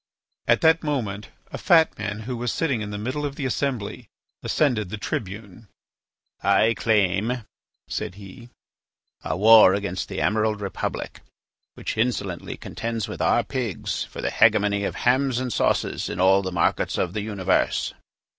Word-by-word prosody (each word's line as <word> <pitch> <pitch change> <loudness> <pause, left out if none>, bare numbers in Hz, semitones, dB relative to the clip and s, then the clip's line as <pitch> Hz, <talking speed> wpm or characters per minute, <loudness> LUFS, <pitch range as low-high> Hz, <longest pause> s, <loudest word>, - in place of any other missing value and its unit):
At 120 0 +4
that 160 0 +5
moment 110 -10 -3 0.2
a - - -6
fat 165 -2 +4
man 105 0 -4
who 125 +3 -4
was 120 0 -2
sitting 140 -9 -1
in 105 - -4
the 105 - -5
middle 130 +8 -3
of 140 -1 -3
the 140 - -4
assembly 130 -5 -2 0.3
ascended 120 -10 +1
the 110 - -5
tribune. 105 +1 -6 0.7
"I 100 +3 +3
claim," 110 +3 +1 0.4
said 90 - -4
he, 105 +5 -12 0.7
"a - - -2
war 110 -1 +7
against 100 -2 -3
the - - -4
Emerald 110 0 +1
Republic, 100 -2 -4 0.6
which - - -4
insolently 120 -2 -2
contends 115 -2 -4
with - - -6
our - - +3
pigs 115 - -3
for - - -8
the - - -1
hegemony 100 0 +3
of - - -3
hams 130 0 +2
and 130 -2 -3
sauces - - 0
in - - -5
all 95 +1 +5
the 95 -1 -4
markets 90 - 0
of 90 -1 -1
the 105 - -2
universe." 100 -3 0
110 Hz, 155 wpm, -24 LUFS, 100-125 Hz, 0.7 s, war